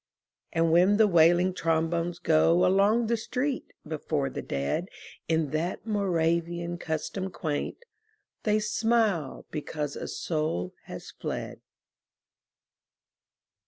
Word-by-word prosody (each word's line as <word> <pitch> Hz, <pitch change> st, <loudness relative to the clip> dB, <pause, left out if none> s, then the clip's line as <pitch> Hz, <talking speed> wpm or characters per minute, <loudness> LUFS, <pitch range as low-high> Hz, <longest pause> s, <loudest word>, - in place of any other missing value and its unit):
And 165 Hz, 0 st, +2 dB
when 180 Hz, +5 st, +5 dB
the 220 Hz, -, +6 dB
wailing 175 Hz, 0 st, +5 dB
trombones 165 Hz, +1 st, 0 dB
go 165 Hz, 0 st, +4 dB
Along 200 Hz, +5 st, +4 dB
the 235 Hz, +1 st, +1 dB
street 255 Hz, +4 st, -2 dB, 0.2 s
before 150 Hz, -3 st, -2 dB
the -, -, -4 dB
dead 70 Hz, -, -2 dB, 0.4 s
In 160 Hz, -3 st, +1 dB
that 165 Hz, +6 st, -2 dB
Moravian 170 Hz, -4 st, 0 dB
custom 160 Hz, +5 st, -3 dB
quaint, 160 Hz, -, -4 dB, 0.6 s
They 210 Hz, -1 st, +2 dB
smile 215 Hz, -, +1 dB
because 150 Hz, -1 st, -4 dB
a -, -, -5 dB
soul 155 Hz, -, -2 dB
has -, -, -8 dB
fled. -, -, -5 dB
170 Hz, 105 wpm, -28 LUFS, 160-200 Hz, 0.6 s, the